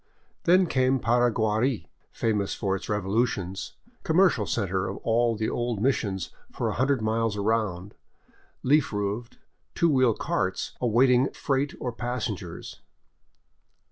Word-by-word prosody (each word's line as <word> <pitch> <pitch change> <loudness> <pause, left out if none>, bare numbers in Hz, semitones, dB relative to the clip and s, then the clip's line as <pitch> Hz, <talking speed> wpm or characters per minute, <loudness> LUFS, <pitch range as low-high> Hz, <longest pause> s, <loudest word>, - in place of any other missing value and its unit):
Then 185 +2 +5
came 130 -4 +2
Paraguari, 120 0 +1 0.2
famous 105 -3 -1
for 95 -1 -1
its 95 - -7
revolutions, 100 -2 -1 0.3
commercial 160 - +3
center 95 -4 -1
of 100 - -5
all 115 0 +2
the 110 0 -1
old 120 -3 -2
missions 100 -7 -1 0.2
for - - -2
a - - -2
hundred 130 -2 +1
miles 110 -1 0
around, 100 -3 -1 0.7
leaf 145 +2 +3
roofed, 105 +3 -3 0.4
two 170 -1 +3
wheel 130 -5 +3
carts 95 0 -2
awaiting 125 +2 +4
freight 140 0 -1
or 125 - -3
passengers. 115 -8 -5
115 Hz, 120 wpm, -26 LUFS, 100-130 Hz, 0.7 s, Then